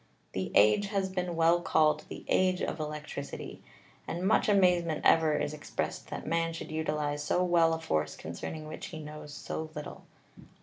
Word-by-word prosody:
The - - -3
Age 105 - +5
has 195 -2 -1
been 180 -2 -2
well 165 +1 +4
called 155 -2 +2
the - - -8
Age 185 -1 +2
of 160 - -2
Electricity, 150 -2 -6 0.5
and 175 +3 -2
much 215 - +3
amazement 180 -5 +3
ever 160 -2 +5
is 145 - -2
expressed 150 - -4
that - - -5
Man 165 0 0
should 165 - -7
utilize 150 -2 -1
so 180 +5 +1
well 170 -2 +4
a - - -5
force 80 - -1
concerning 155 - -6
which 155 - -7
he 160 - -7
knows 150 -1 -8
so 155 +2 -5
little. 150 - -7
160 Hz, 170 wpm, -30 LUFS, 150-175 Hz, 0.5 s, Age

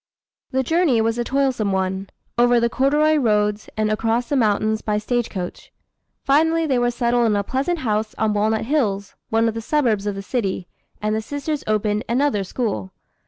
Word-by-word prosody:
The 265 0 0
journey 320 -4 +2
was 225 +1 0
a - - +1
toilsome 260 -5 0
one, 190 0 -1 0.3
over 240 0 +4
the 235 0 +1
corduroy 300 +4 +3
roads 210 -4 +1
and 215 0 +1
across 225 +3 0
the 285 - +1
mountains 215 -2 +1
by 210 -1 -1
stagecoach. 210 -5 -3 0.5
Finally 320 +4 +3
they 265 -5 +1
were 240 0 +2
settled 240 -1 +1
in 210 - +2
a 200 - +1
pleasant 275 - -1
house 215 -2 -1
on 220 -1 +1
Walnut 215 +1 +1
Hills, 210 -8 0 0.2
one 225 +1 +2
of 225 - 0
the 225 - -4
suburbs 225 -6 +1
of 205 - -1
the 195 - -6
city, 195 -5 -2 0.4
and 215 0 +1
the 220 - -1
sisters 285 +4 -4
opened 210 0 0
another 245 -4 +1
school. 180 - -3
225 Hz, 180 wpm, -21 LUFS, 210-265 Hz, 0.5 s, over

